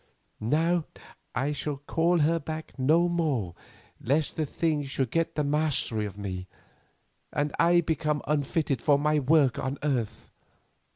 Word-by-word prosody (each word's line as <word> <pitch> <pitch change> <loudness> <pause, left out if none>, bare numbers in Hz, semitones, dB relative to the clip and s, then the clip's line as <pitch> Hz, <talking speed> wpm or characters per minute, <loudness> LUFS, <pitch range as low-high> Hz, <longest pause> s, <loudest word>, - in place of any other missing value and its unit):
Now 160 +8 +1 0.5
I 135 +4 0
shall 145 0 -3
call 165 +4 +1
her 165 +3 +3
back 160 +1 -6
no 160 +7 +4
more 150 - -1 0.5
lest 145 +5 0
the 155 -2 -1
thing 155 -1 0
should 135 -3 -2
get 165 0 0
the 150 - +1
mastery 145 -7 +1
of 100 - -10
me, 95 -2 -5 0.8
and 145 0 -1
I 175 +1 +5
become 150 -2 -1
unfitted 145 -3 0
for 145 -1 +4
my 150 +1 +2
work 140 -2 +3
on 135 +2 -3
earth. 120 -7 -2
150 Hz, 140 wpm, -27 LUFS, 130-160 Hz, 0.8 s, I